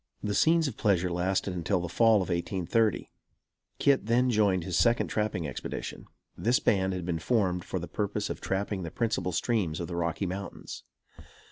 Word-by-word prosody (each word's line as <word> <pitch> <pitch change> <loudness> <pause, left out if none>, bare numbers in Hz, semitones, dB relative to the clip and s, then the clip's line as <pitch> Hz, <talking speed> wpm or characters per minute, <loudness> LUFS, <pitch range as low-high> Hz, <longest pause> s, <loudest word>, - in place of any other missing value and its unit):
The 105 - -1
scenes 160 +6 +4
of 125 - -5
pleasure 90 -4 +2
lasted 95 +2 0
until 90 +2 0
the 90 - -3
fall 110 +2 +4
of - - -8
1830. 95 +5 0 0.7
Kit 135 -6 +2
then 125 +2 +3
joined 100 -5 +2
his 90 -1 -3
second 115 +8 +3
trapping 105 -7 -1
expedition. 65 - -6 0.3
This 120 +3 +2
band 95 -2 +1
had 90 -2 -4
been 85 -2 -1
formed 90 -2 +1
for - - -4
the 85 -1 -5
purpose 105 0 -2
of - - -6
trapping 95 0 -2
the 85 - -4
principal 110 -1 -1
streams 90 -3 0
of 85 - -3
the 85 - -5
Rocky 85 +3 -1
Mountains. 95 +2 -6
95 Hz, 175 wpm, -29 LUFS, 90-110 Hz, 0.7 s, scenes